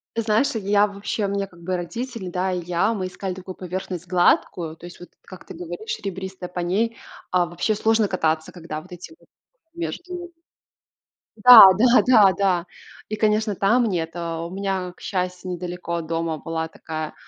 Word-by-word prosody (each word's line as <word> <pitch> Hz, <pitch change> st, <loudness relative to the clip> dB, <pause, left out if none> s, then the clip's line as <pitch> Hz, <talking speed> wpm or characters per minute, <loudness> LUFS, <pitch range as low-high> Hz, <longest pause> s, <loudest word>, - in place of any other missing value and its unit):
.Ты 230 Hz, -, 0 dB
знаешь, 225 Hz, +4 st, +1 dB
я 205 Hz, 0 st, +2 dB
вообще, 200 Hz, +1 st, -3 dB
у -, -, 0 dB
меня, 200 Hz, 0 st, -1 dB
как 175 Hz, -2 st, -19 dB
бы, 180 Hz, +1 st, -2 dB
родители, 230 Hz, +2 st, -5 dB
да, 185 Hz, +1 st, -1 dB
и 180 Hz, -, -1 dB
я, 180 Hz, +6 st, +1 dB
мы 185 Hz, -2 st, -3 dB
искали 185 Hz, 0 st, -5 dB
такую 185 Hz, 0 st, -8 dB
поверхность 180 Hz, -1 st, -6 dB
гладкую, 175 Hz, -2 st, +1 dB
то 170 Hz, -, -13 dB
есть, 175 Hz, -, -13 dB
вот 175 Hz, -, -12 dB
как 185 Hz, -, -13 dB
ты -, -, -10 dB
говоришь 175 Hz, +6 st, -6 dB
ребристая, 190 Hz, -2 st, -6 dB
по 180 Hz, -, -6 dB
ней, 215 Hz, +6 st, 0 dB, 0.3 s
а, 180 Hz, -1 st, +3 dB
вообще 175 Hz, +5 st, -1 dB
сложно 220 Hz, 0 st, +2 dB
кататься, 160 Hz, -4 st, -1 dB
когда 160 Hz, -3 st, -7 dB
вот 180 Hz, -, -18 dB
эти 180 Hz, -, -10 dB
вот -, -, -25 dB, 0.5 s
между 350 Hz, +1 st, -6 dB, 1.1 s
Да 220 Hz, -7 st, +11 dB
да 240 Hz, +5 st, +5 dB
да 215 Hz, -6 st, +6 dB
да. 185 Hz, -3 st, +1 dB, 0.4 s
И, 215 Hz, -, -2 dB
конечно, 215 Hz, -1 st, +1 dB
там 235 Hz, +6 st, +3 dB
нет 165 Hz, -5 st, -2 dB
Э, 170 Hz, -1 st, -4 dB
у 170 Hz, -, -6 dB
меня, 190 Hz, -1 st, -3 dB
к -, -, -23 dB
счастью, 180 Hz, -1 st, -3 dB
недалеко 180 Hz, -1 st, -5 dB
от 165 Hz, -2 st, -4 dB
дома 165 Hz, -1 st, -2 dB
была 160 Hz, +1 st, -4 dB
такая, 155 Hz, -1 st, -6 dB
185 Hz, 185 wpm, -23 LUFS, 175-210 Hz, 1.1 s, Да